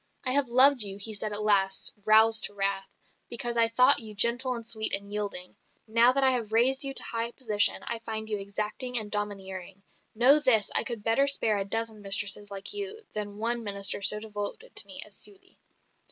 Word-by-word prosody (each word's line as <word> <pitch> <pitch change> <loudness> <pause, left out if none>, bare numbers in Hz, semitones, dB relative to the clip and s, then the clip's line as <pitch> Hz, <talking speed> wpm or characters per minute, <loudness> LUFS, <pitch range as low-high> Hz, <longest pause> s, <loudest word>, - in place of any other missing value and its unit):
"I 255 - 0
have 280 0 +1
loved 260 +2 +5
you," 200 -1 -1
he 215 +2 -3
said 210 +1 -1
at 210 0 0
last, 195 -2 +1
roused 220 +1 +5
to 205 - -7
wrath, 195 -1 -2 0.4
"because 240 0 -2
I 230 -1 +3
thought 250 +4 +5
you 215 -2 -6
gentle 245 +4 +2
and 230 -1 -8
sweet 220 -1 +2
and 200 +1 -10
yielding; 205 -3 -5 0.3
now 230 +3 +3
that 275 +1 0
I 265 - +4
have 235 -4 -3
raised 255 +5 +2
you 275 - 0
to - - +6
high 230 0 -3
position, 215 -5 0
I 235 - -4
find 220 -1 -7
you 210 -2 -4
exacting 210 +5 -3
and 215 -2 -1
domineering. 195 -2 -6 0.3
Know 260 +6 +6
this, 240 -8 +2
I - - +3
could 235 -4 -6
better 230 +6 +1
spare 225 -6 +1
a 195 - -3
dozen 225 +1 -2
mistresses 200 +1 0
like 200 - -3
you 410 +2 -7
than 205 -1 -5
one 235 +2 -3
minister 200 -1 -2
so 210 +2 +6
devoted 215 - -8
to - - -1
me - - -8
as - - -11
Sully." 400 -2 -10
220 Hz, 205 wpm, -26 LUFS, 205-240 Hz, 0.4 s, to